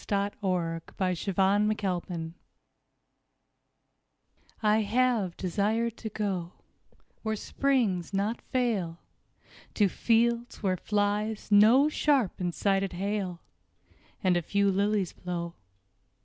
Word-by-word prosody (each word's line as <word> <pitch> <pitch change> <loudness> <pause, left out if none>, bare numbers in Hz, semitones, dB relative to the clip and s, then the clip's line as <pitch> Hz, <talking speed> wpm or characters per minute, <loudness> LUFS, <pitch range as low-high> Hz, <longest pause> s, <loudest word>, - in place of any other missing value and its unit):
HOPWOOD 185 -5 -1 0.2
I 185 -1 +2
HAVE 175 - -6
DESIRED 200 +3 +2
TO 185 -4 -1
GO 165 -2 -5 2.3
I 210 0 +4
HAVE 220 -4 +1
desired 215 +5 0
to 220 - -5
go 190 -5 -3 0.7
Where 220 -1 -1
springs 220 -8 0
not 205 +4 -1
fail, 215 -10 -1 0.8
To 205 - +4
fields 235 +3 +1
where 185 -2 +1
flies 210 +2 -1
no 225 +8 +7
sharp 285 - +1
and 180 -1 -1
sided 195 +1 0
hail, 190 -1 -3 0.8
And 185 -2 +3
a 175 - +2
few 200 +4 +1
lilies 200 -1 0
blow. 170 -1 -5
200 Hz, 105 wpm, -28 LUFS, 185-220 Hz, 2.3 s, no